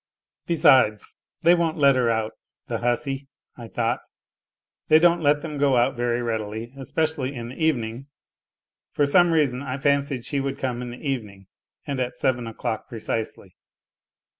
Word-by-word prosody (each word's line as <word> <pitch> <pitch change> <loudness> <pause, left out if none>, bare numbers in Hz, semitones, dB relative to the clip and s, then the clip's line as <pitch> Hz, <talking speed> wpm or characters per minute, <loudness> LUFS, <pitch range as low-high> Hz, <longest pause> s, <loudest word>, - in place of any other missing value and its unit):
Besides, 130 -10 +4 0.3
they 170 +1 +7
won't 170 -2 +1
let 140 -2 +5
her 125 -2 +2
out, 110 -1 0 0.2
" - - -54
the - - -2
hussy! 135 +3 -1
" - - -51
I 120 -2 -9
thought. 120 +2 -1 0.9
They 155 - +7
don't 170 +1 +4
let 145 -1 +2
them 150 -3 -5
go 140 -3 +3
out 125 +3 +2
very 120 0 -1
readily, 110 +1 -4
especially 145 0 -2
hi 120 - -5
the 125 +7 -6
evening 125 -4 -1 0.9
(for 145 - +2
some 175 +5 +5
reason 140 -6 +2
I 130 -1 -4
fancied 140 -2 0
she 140 - -1
would 135 0 -3
come 125 -2 -3
in 125 - -5
the 125 +5 -7
evening, 105 -8 -4 0.4
and 140 -2 -3
at 125 -1 -2
seven 125 -3 0
o'clock 110 0 -4
precisely). 110 -1 -5
130 Hz, 165 wpm, -24 LUFS, 120-145 Hz, 0.9 s, they